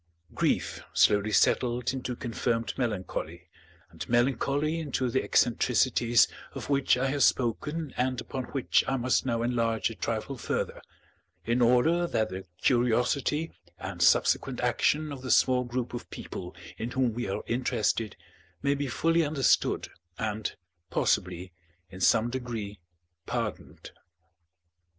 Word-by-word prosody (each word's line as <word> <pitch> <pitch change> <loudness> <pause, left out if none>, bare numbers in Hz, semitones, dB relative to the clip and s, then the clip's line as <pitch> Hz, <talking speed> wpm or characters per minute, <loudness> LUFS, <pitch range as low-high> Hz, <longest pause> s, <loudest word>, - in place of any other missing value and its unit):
Grief - - 0
slowly 105 +1 +4
settled 120 +3 +2
into 125 -1 -4
confirmed 115 -1 -2
melancholy, 110 -8 -4 0.4
and - - -8
melancholy 140 +6 +1
into 130 -5 -2
the 130 - +1
eccentricities 120 -1 +3 0.3
of - - -5
which 140 -2 +3
I 130 - 0
have 145 +1 -1
spoken 150 +6 +1
and 130 0 0
upon 130 +1 -5
which 135 0 +1
I 135 - +1
must 130 +1 +1
now 115 -2 0
enlarge 115 -2 0
a - - -8
trifle - - -3
further, - - -3 0.6
in 120 +2 +1
order 140 +9 +4
that 110 -8 0
the 95 +1 -7 0.2
curiosity 125 +6 +1 0.3
and - - -6
subsequent - - +3
action 155 0 +1
of 135 -2 -7
the 130 - -6
small 125 -1 +4
group 125 0 -3
of 120 - -6
people 90 -1 -7 0.2
in 115 - -3
whom 125 -2 0
we 120 -3 -3
are 95 - -3
interested 115 -3 0 0.5
may 140 0 +3
be 145 0 -2
fully 165 +6 +2
understood 145 -3 +1 0.3
and, 110 0 -3 0.3
possibly, 90 +1 0 0.4
in 95 - -10
some 115 +6 +3
degree 115 -5 -5 0.5
pardoned. - - -4
125 Hz, 130 wpm, -28 LUFS, 115-135 Hz, 0.6 s, slowly